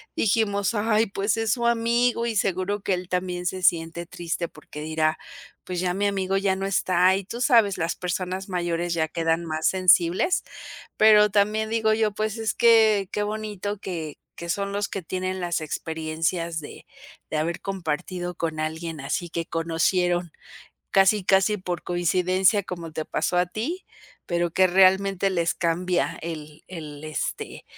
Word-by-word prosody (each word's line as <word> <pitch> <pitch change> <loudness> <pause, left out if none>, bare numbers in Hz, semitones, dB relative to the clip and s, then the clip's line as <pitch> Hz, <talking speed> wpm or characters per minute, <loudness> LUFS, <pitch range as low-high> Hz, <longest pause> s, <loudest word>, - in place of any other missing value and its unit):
dijimos: 205 0 +1
"Ay, 215 +1 +2
pues 200 +3 -1
es 225 -1 +1
su 240 -3 -2
amigo 235 0 +2
y 225 - -2
seguro 195 +1 0
que 195 - 0
él 180 0 -4
también 180 -1 -2
se 185 0 -3
siente 170 0 +1
triste". 170 0 -4
Porque 150 -1 -11
dirá: 155 0 0 0.5
"Pues 180 -1 -4
ya 180 0 0
mi 205 +1 0
amigo 195 -1 0
ya 195 -1 +1
no 195 +1 -3
está", 185 -1 +3
y 195 - -3
tú 235 +6 -7
sabes, 230 -8 +4
las 165 +1 -1
personas 185 +1 -3
mayores 175 -1 -1
ya 160 -1 0
quedan 165 +1 0
más 155 0 -3
sensibles. 185 - +3 0.5
Pero 210 -1 +6
también 215 +2 +1
digo 220 -1 +2
yo, 215 -1 +1
pues 215 +2 -2
es 225 -1 -1
que, 220 -4 +4
qué 210 - -1
bonito 210 -1 -4
que 165 -6 -6 0.2
que 170 - -7
son 200 +2 -1
los 205 0 -1
que 195 - -5
tienen 185 +2 -3
las 175 -1 -1
experiencias 160 +2 -2
de 145 - -11 0.4
de - - -4
haber 170 +3 -1
compartido 180 -1 -3
con 160 -2 -3
alguien 160 0 -4
así, 140 +5 -2
que 165 0 -3
conocieron 175 +1 0 0.6
casi, 195 +1 +4
casi 195 +2 +3
por 180 -2 -4
coincidencia 185 +3 +2
como 170 -3 -6
te 155 - -3
pasó 160 +4 -1
a 180 - +3
ti, 245 - -4 0.4
pero 175 -1 0
que 185 +1 +5
realmente 190 +1 +4
les 170 -2 0
cambia 175 +1 0
el 155 -2 -7
el, 155 -4 -8
este, 155 -1 -4
185 Hz, 165 wpm, -25 LUFS, 170-205 Hz, 0.6 s, Pero